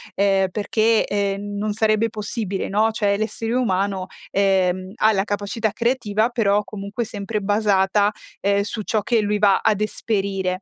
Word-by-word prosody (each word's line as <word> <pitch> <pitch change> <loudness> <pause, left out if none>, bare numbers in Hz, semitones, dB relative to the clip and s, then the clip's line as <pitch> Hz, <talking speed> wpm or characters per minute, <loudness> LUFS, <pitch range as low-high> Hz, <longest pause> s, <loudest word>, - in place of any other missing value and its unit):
ehm, 195 -1 +3
perché, 220 +2 +2
ehm, 200 0 -2
non 210 0 -1
sarebbe 220 +1 +2
possibile, 210 -2 -4
no; 215 +3 +2
cioè, 205 -2 +1
l'essere 225 +2 -3
umano, 195 -5 0 0.3
ehm, 190 -1 +1
ha 220 -1 +4
la 195 -2 0
capacità 205 +1 -2
creativa 230 -2 0
però 210 -4 +1
comunque 205 +3 -5
sempre 210 0 -4
basata, 205 0 +2 0.3
ehm, 200 0 +2
su 215 +1 -4
ciò 215 +1 0
che 230 +3 +1
lui 210 0 0
va 200 -2 +4
ad 210 -2 +1
esperire. 195 -3 -1
205 Hz, 155 wpm, -22 LUFS, 195-220 Hz, 0.3 s, ha